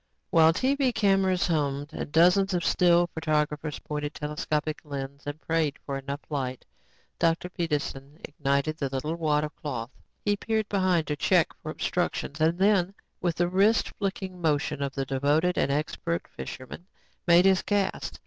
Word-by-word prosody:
While 160 -1 +6
TV 260 - +1
cameras 195 -3 +3
hummed 145 -2 -1
and - - -5
dozens 180 +4 +4
of 175 - -1
still 175 -1 +4
photographers 150 -1 -1
pointed 150 0 -5
telescopic 150 0 -2
lenses 140 -1 -7
and 145 +1 -4
prayed 160 -3 0
for 140 - -3
enough 140 +1 -5
light, 130 -4 -3 0.5
Dr. 165 +1 +1
Peterson 150 -4 -3
ignited 145 +1 -1
the 140 - -1
little 135 +4 -2
wad 150 -3 +1
of 150 - -5
cloth. 120 -5 -5 0.3
He 205 -1 +3
peered 220 0 -1
behind 185 -5 +2
to 150 - -2
check 170 +2 +2
for 155 - -6
obstructions 155 -2 -2
and 165 +2 +3
then, 195 -1 +3 0.3
with 175 -3 0
the 175 - +1
wrist 200 +5 +3
flicking 190 -2 -3
motion 145 -3 0
of 140 -1 -3
the 135 -1 -1
devoted 145 +7 +1
and 140 - +1
expert 160 +3 -2
fisherman, 130 +7 -8 0.4
made 175 +1 +6
his 190 -1 +5
cast. 205 -2 -1
160 Hz, 160 wpm, -27 LUFS, 145-180 Hz, 0.5 s, While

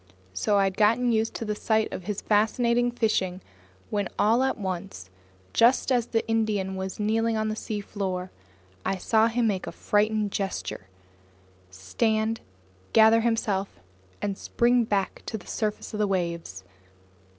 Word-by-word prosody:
So 205 - +1
I 200 - +4
had 195 0 -1
gotten 230 +3 +3
used 225 0 0
to 230 - -4
the 210 - -1
sight 220 +1 0
of 180 - -6
this 210 -2 -2
fascinating 235 +3 +2
fishing 195 -6 0 0.5
when 205 -3 -1
all 225 +4 +3
at 265 0 +1
once, 185 - -5 0.4
just 245 +3 +4
as 245 -2 +2
the 225 -1 -1
Indian 215 -4 0
was 190 +1 -5
kneeling 225 +2 +1
on 215 0 0
the 215 - -2
seafloor, 195 -4 -4 0.5
I 190 0 -1
saw 220 +4 +3
him 235 +1 0
make 195 -4 -1
a - - -4
frightened 210 0 +1
gesture, 195 - -4 0.8
stand, 220 - -1
and 95 0 -31
gather 225 +1 +6
himself 210 - -1 0.4
to 205 -1 0
spring 240 +4 +2
back 200 -3 -1
to 220 - -3
the 190 - -14
surface 215 0 -3
of 210 - -4
the 210 - +2
waves. 170 - -3
210 Hz, 155 wpm, -26 LUFS, 190-225 Hz, 0.8 s, gather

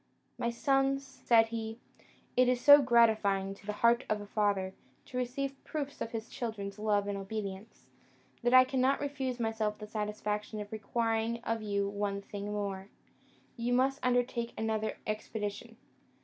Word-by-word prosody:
"My 235 - 0
sons," 270 +3 +1
said 245 -4 +3
he, 225 -1 -4 0.6
"it 250 0 +5
is 250 -1 +2
so 285 +3 +9
gratifying 220 -6 +3
to 200 +1 -16
the - - 0
heart 235 +2 +5
of 215 - +1
a 205 - -7
father 200 -2 0 0.3
to 255 - -7
receive 270 +2 -3
proofs 285 -2 -5
of - - -2
his 225 0 -5
children's 210 -5 -5
love 205 -1 +1
and 205 - -2
obedience, 200 +1 -6 0.6
that 240 -1 +2
I 255 0 +9
cannot 260 +1 +1
refuse 270 -3 -3
myself 220 -2 -1
the 210 - -7
satisfaction 210 0 -3
of 205 -1 -7
requiring 225 +1 -1
of 225 -1 -1
you 200 -1 0
one 200 0 -2
thing 205 +1 -6
more. 200 -1 -3 0.7
You 240 +1 -1
must 270 +2 +2
undertake 245 -1 0
another 220 -1 -1
expedition. 215 +1 -4
225 Hz, 155 wpm, -31 LUFS, 210-250 Hz, 0.7 s, so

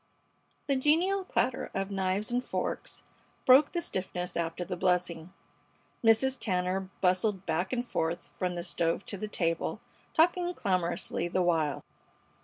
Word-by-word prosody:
The 280 - +2
genial 335 +9 +3
clatter 260 -8 0
of 195 +1 -2
knives 195 +3 -1
and 245 +1 0
forks - - -3 0.4
broke 265 +3 +7
the 345 -1 -2
stiffness 180 - -3
after 170 +1 -2
the 180 - -3
blessing. 180 -2 0 0.7
Mrs. 245 +4 +4
Tanner 185 -1 -1
bustled 185 +1 +2
back 175 +4 -1
and 250 -1 -1
forth 170 -6 -2
from 180 -1 -2
the 175 - -3
stove 170 0 -1
to 200 - -4
the 215 - -3
table, 165 -5 -1 0.4
talking 350 +2 +3
clamorously 175 -3 -1
the 180 +1 +1
while. 160 -5 +1
190 Hz, 140 wpm, -30 LUFS, 175-250 Hz, 0.7 s, broke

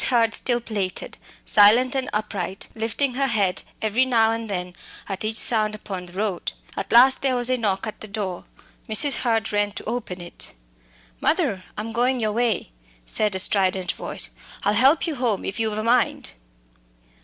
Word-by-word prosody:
Hurd 230 -3 +2
still 240 -1 +2
plaited, 205 -5 -4 0.3
silent 230 +5 +6
and 265 -1 -2
upright, 195 -3 -3
lifting 230 +4 0
her 270 +2 0
head 200 -6 +1 0.2
every 220 +4 +2
now 230 -4 +3
and 225 -1 -4
then 180 -2 -4 0.3
at 195 0 -4
each 220 +1 -1
sound 215 -2 +4
upon 190 -4 -7
the 175 - -10
road. 195 -2 -3 0.2
At 195 - -5
last 260 +3 +6
there 265 -2 +1
was 245 0 +2
a 255 - +2
knock 205 -4 -1
at 215 - -7
the 215 - -7
door. 200 -4 -5 0.4
Mrs. 245 +7 +4
Hurd 225 -4 0
ran 205 0 0
to - - -7
open 220 -5 -4
it. 175 0 -6 0.7
"Mother, 185 - 0
I'm 220 +2 -4
going 245 +3 +1
your 215 -2 0
way," 230 - -1 0.3
said 210 - 0
a - - -1
strident 185 -2 +2
voice. - - -2 0.3
"I'll 205 - +2
help 270 +7 +4
you 330 - -2
home 235 -5 -1
if 195 - -4
you've 220 -1 0
a 215 - -2
mind." 235 - +1
215 Hz, 180 wpm, -23 LUFS, 200-240 Hz, 0.7 s, silent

